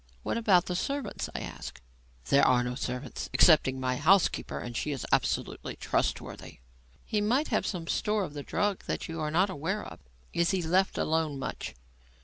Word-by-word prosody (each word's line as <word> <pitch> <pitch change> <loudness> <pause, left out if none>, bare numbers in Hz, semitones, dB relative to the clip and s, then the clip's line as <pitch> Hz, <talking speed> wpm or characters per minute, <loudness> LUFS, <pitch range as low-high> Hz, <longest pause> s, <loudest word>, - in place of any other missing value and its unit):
"What - - -1
about 200 -6 +4
the 180 - -3
servants?" 275 +3 -3
I - - -2
asked. - - -7 0.5
"There 140 - +5
are 125 -1 +4
no 125 0 -2
servants 125 +1 -4
excepting 140 -5 +5
my 130 -1 0
housekeeper, 180 +6 +3
and 120 -1 -6
she 150 - -1
is 140 -4 -3
absolutely - - 0
trustworthy." - - -2 0.5
"He 210 - 0
might 250 +9 +1
have 215 - +1
some 175 -4 -3
store 210 +4 0
of 150 - -6
the 145 - -5
drug 205 +6 -1
that - - -2
you 165 -1 -5
are 155 - -1
not 185 +5 +2
aware 190 +5 -2
of. - - -10 0.3
Is 170 0 +2
he 190 -2 0
left 185 +4 +2
alone 155 -2 0
much?" 135 - -5
165 Hz, 180 wpm, -29 LUFS, 140-200 Hz, 0.5 s, There